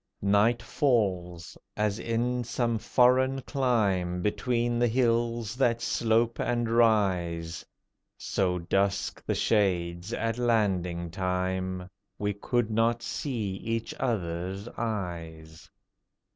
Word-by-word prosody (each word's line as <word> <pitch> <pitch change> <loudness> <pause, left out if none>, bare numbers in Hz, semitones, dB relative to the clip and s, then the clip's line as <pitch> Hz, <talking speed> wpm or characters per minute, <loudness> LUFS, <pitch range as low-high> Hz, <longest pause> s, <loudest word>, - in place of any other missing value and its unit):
Night 105 +4 +3
falls 90 - 0 0.2
as 105 0 0
in 120 +2 -1
some 115 -1 -1
foreign 130 +3 +3
clime, 100 -10 0
Between 120 +2 0
the 120 - +4
hills 115 -2 +1
that 120 -3 +2
slope 115 0 +1
and 120 -1 0
rise. 95 -8 +1 0.5
So 90 -2 0
dusk 100 +3 -1
the - - +1
shades 90 -3 0
at 115 0 -2
landing 95 -8 0
time, 95 0 -2 0.3
We 105 0 -1
could 115 +3 -1
not 115 +2 +1
see 110 -9 -3
each 115 +2 -3
other's 95 -4 -2
eyes. 85 -9 -5
105 Hz, 105 wpm, -28 LUFS, 90-120 Hz, 0.5 s, the